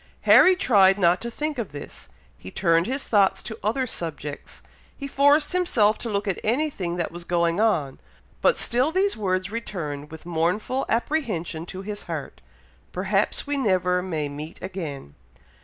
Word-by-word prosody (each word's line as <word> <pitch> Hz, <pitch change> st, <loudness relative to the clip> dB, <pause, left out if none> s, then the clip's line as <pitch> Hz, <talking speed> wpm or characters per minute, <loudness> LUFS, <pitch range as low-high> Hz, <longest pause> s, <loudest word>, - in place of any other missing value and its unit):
Harry 370 Hz, 0 st, +7 dB
tried 195 Hz, -, +4 dB
not 180 Hz, -2 st, +3 dB
to 235 Hz, -, -4 dB
think 295 Hz, +3 st, -3 dB
of 225 Hz, -, -4 dB
this; 145 Hz, -, -10 dB, 0.3 s
he 90 Hz, -, -11 dB
turned 165 Hz, -, +2 dB
his 270 Hz, +3 st, -3 dB
thoughts 195 Hz, -3 st, +3 dB
to 220 Hz, -1 st, -7 dB
other 235 Hz, +6 st, 0 dB
subjects; 150 Hz, -, -6 dB, 0.3 s
he 280 Hz, -, -5 dB
forced 285 Hz, +2 st, +3 dB
himself 235 Hz, -, +2 dB
to 235 Hz, -, -4 dB
look 205 Hz, 0 st, -1 dB
at 195 Hz, -, -1 dB
anything 225 Hz, -, -1 dB
that 170 Hz, -2 st, -2 dB
was 175 Hz, +1 st, -8 dB
going 170 Hz, +1 st, +1 dB
on, 165 Hz, -12 st, +1 dB, 0.4 s
but -, -, +3 dB
still 255 Hz, +6 st, +1 dB
these 390 Hz, +3 st, +1 dB
words 185 Hz, -2 st, -1 dB
returned 150 Hz, -11 st, -5 dB
with 160 Hz, +1 st, -11 dB
mournful 175 Hz, +10 st, -1 dB
apprehension 210 Hz, -, -2 dB
to 190 Hz, +2 st, -7 dB
his 205 Hz, +1 st, -6 dB
heart, 160 Hz, -5 st, -6 dB, 0.5 s
"Perhaps 195 Hz, +2 st, 0 dB
we 290 Hz, 0 st, -1 dB
never 185 Hz, -7 st, +1 dB
may 160 Hz, -5 st, -3 dB
meet 150 Hz, +3 st, -8 dB
again!" 160 Hz, -, -6 dB
195 Hz, 160 wpm, -24 LUFS, 170-235 Hz, 0.5 s, Harry